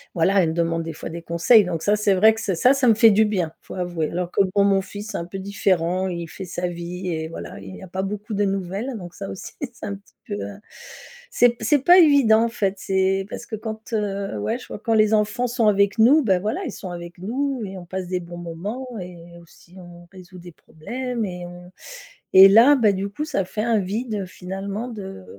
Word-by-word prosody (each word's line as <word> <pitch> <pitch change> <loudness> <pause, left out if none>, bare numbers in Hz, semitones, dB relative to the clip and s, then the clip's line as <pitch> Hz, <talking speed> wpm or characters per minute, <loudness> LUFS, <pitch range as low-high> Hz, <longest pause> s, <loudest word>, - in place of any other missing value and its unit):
voilà, 190 +4 +3
elle 165 - +1
me - - -2
demande 165 0 0
des 165 0 -6
fois 160 - -7
des 170 +1 -7
conseils, 170 +7 +4
donc 165 -3 -4
ça 210 +1 +2
c'est 205 -1 +2
vrai 215 +4 +5
que 220 - -7
c'est 195 -4 -1
ça, 250 +10 +4
ça 270 -2 +1
me 225 - +7
fait 225 0 +6
du 220 +2 +4
bien, 185 -7 -1
faut - - -11
avouer. 175 -4 -2
Alors 175 0 -3
que - - -2 0.2
bon, 200 - +5
mon 195 -1 +3
fils, 205 +2 -8
c'est - - -3
un 170 - -4
peu 190 +3 -7
différent, 185 -2 0
il 170 -2 -5
fait 190 +4 -8
sa 180 0 -3
vie 175 +2 -6
et 160 -2 -3
voilà, 165 - -8
il 95 -1 -10
y - - -11
a - - -9
pas 190 +2 -3
beaucoup 205 +2 -5
de 205 0 +1
nouvelles, 195 +6 -3
donc 175 -3 -9
ça 195 +1 -7
aussi 190 - -8
c'est 245 -6 -7
un 200 - -4
petit 200 +1 -19
peu, 205 - -4
heu 205 - -5 0.8
c'est 245 - +5
p 235 - -6
c'est 295 - +4
pas 350 +7 +6
évident, 270 -9 +5
en 235 - -1
fait, 200 -4 -1
c'est 190 0 0
parce 240 - -7
que 225 -2 -6
quand, 220 +1 -7
heu 200 - -2
ouais, 225 - -1
je 250 - -13
vois - - -8
quand 225 +1 -1
les 215 0 +4
enfants 215 +3 +1
sont 235 -2 +1
avec 200 +1 +2
nous, 280 +7 +6
bah 190 -6 +2
voilà, 215 - -2
ils 270 - -4
sont 185 -2 -8
avec 175 0 -8
nous 255 +7 -2
et 190 -1 -8
on 180 - -9
passe 185 +1 -5
des 180 0 -2
bons 175 0 -10
moments 185 +10 -6
et 180 -1 -9 0.2
aussi 170 +1 -20
on 175 -1 -13
résout 185 0 -13
des 175 -1 -12
problèmes 240 +10 -5
et 180 -2 -6
on 175 +1 -12 0.6
et 190 +1 +10
là, 230 +9 +7
bah 215 -5 +3
du 195 +1 -3
coup, 295 +10 -5
ça 195 -10 -1
fait 210 +3 -4
un 230 -2 +2
vide 210 +1 -3
finalement 195 +5 -6
de 195 - -8
195 Hz, 245 wpm, -22 LUFS, 175-220 Hz, 0.8 s, et